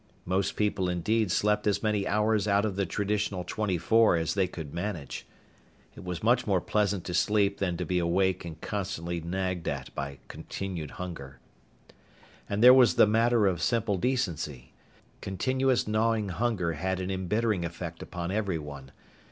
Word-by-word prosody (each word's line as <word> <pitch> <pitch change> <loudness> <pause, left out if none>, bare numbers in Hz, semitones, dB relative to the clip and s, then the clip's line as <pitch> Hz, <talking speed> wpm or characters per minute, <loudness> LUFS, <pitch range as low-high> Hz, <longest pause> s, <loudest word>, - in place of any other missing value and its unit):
Most 95 +2 0
people, 100 -3 0
indeed, 105 +4 +1
slept 105 +3 +1
as 105 - +1
many 105 -2 +1
hours 105 0 +1
out 100 +1 +3
of 105 -3 -2
the 100 -2 -1
traditional 100 -2 -1
twenty 95 0 -1
four 110 +5 +4
as 80 -1 0
they 95 -2 +1
could 80 -5 -8
manage. 85 -5 -5 0.7
It - - -11
was 90 -1 -5
much 120 +2 +3
more 95 -3 +3
pleasant 100 -1 0
to 90 - -5
sleep 100 +1 +2
than 90 -3 -1
to - - -3
be 90 -1 0
awake 90 +2 +1
and 80 -2 -8
constantly 85 -4 -3
nagged 90 0 -3
at 70 -3 -4
by 70 -1 -5
continued 90 -6 -6
hunger. 75 -8 -7 1.1
And 105 +2 0
there 125 +1 +11
was 130 -2 +6
the - - +7
matter 115 +1 +3
of 90 -4 +1
simple 115 -3 +1
decency. 85 - -2 0.5
Continuous 130 +6 0
gnawing 110 -1 +1
hunger 95 -3 -1
had 95 +4 -2
an 95 +1 -3
embittering 95 +1 0
effect 85 -1 -6
upon 85 0 -5
everyone. 75 -10 -3
95 Hz, 160 wpm, -28 LUFS, 85-105 Hz, 1.1 s, there